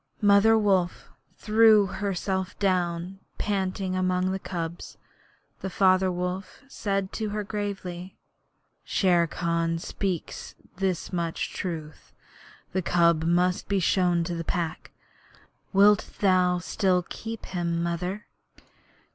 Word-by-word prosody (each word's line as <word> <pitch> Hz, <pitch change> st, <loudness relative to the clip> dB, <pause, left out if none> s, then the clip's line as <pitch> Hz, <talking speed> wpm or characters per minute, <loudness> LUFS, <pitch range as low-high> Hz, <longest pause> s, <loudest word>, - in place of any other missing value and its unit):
Mother 205 Hz, +2 st, +6 dB
Wolf 190 Hz, -4 st, +1 dB, 0.3 s
threw 215 Hz, -1 st, +5 dB
herself 190 Hz, -1 st, -3 dB
down 180 Hz, -1 st, -1 dB, 0.2 s
panting 190 Hz, -2 st, -1 dB
among 185 Hz, 0 st, +1 dB
the 190 Hz, -, -2 dB
cubs, 170 Hz, -2 st, -6 dB, 0.6 s
and 190 Hz, -, -4 dB
Father 185 Hz, 0 st, +3 dB
Wolf 180 Hz, +6 st, -4 dB
said 195 Hz, -6 st, -2 dB
to 220 Hz, -2 st, -2 dB
her 210 Hz, 0 st, -3 dB
gravely: 195 Hz, -3 st, -5 dB, 0.7 s
'Shere 175 Hz, -3 st, +2 dB
Khan 165 Hz, 0 st, -1 dB
speaks 180 Hz, +1 st, -4 dB, 0.2 s
this 190 Hz, -1 st, -2 dB
much 170 Hz, -2 st, -2 dB
truth. 160 Hz, -4 st, -6 dB, 0.6 s
The 190 Hz, -, +1 dB
cub 170 Hz, -2 st, +3 dB
must 180 Hz, +2 st, +1 dB
be 200 Hz, -1 st, +1 dB
shown 175 Hz, -1 st, +2 dB
to 175 Hz, +1 st, -3 dB
the 165 Hz, 0 st, -3 dB
Pack. 165 Hz, -1 st, -3 dB, 0.8 s
Wilt 205 Hz, +1 st, +5 dB
thou 185 Hz, -2 st, +3 dB
still 180 Hz, 0 st, 0 dB
keep 225 Hz, 0 st, -7 dB
him, 170 Hz, -2 st, -2 dB
Mother?' 180 Hz, +4 st, -3 dB
185 Hz, 115 wpm, -26 LUFS, 175-195 Hz, 0.8 s, Mother